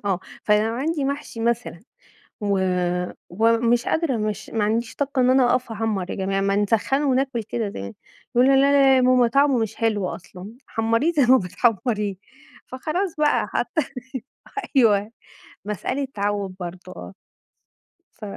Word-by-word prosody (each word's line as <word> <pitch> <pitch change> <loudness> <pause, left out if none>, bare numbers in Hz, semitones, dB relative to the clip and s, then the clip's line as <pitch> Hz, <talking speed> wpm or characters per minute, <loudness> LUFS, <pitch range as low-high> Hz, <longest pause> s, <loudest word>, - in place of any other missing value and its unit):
آه، 190 -2 0 0.2
فلو 215 +2 +2
عندي 290 +3 -1
محشي 280 -4 -4
مثلًا 235 -6 -1 0.6
و 200 -2 +1 0.7
ومش 230 +4 +2
قادرة 315 -7 0
مش 215 -1 -3
ما 220 -2 -1
عنديش 225 +2 -1
طاقة 280 -1 -2
إن 250 - +4
أنا 260 0 +5
أوقف 245 -2 0
أحمّر 215 -4 -2
يا - - -3
جماعة 195 0 -1
ما 195 0 +1
نسخّنه 225 +7 +1
وناكل 260 -2 0
كده 220 0 -3
زي 100 - -7 0.4
يقولوا 265 +3 +5
لأ، 270 - +5
لأ 275 -2 +5
يا 255 - +4
ماما 250 -1 +4
طعمه 275 +1 +3
مش 220 -1 -2
حلو 210 -4 0
أصلًا، 190 +5 -12
حمّريه 230 +8 +1
زي 285 -4 +3
ما 260 +2 +6
بتحمّريه. 210 +1 0 0.5
فخلاص 320 +8 -3
بقى 300 -1 +2
حتى 315 - -1 0.7
ح 415 - -6 0.2
أيوه 210 -3 +4 0.5
مسألة 255 +7 -3
تعوّد 200 -2 -2
برضه، 180 +1 -8
آه. 90 +1 -9 1.0
ف - - -16
230 Hz, 150 wpm, -23 LUFS, 205-265 Hz, 1.0 s, ما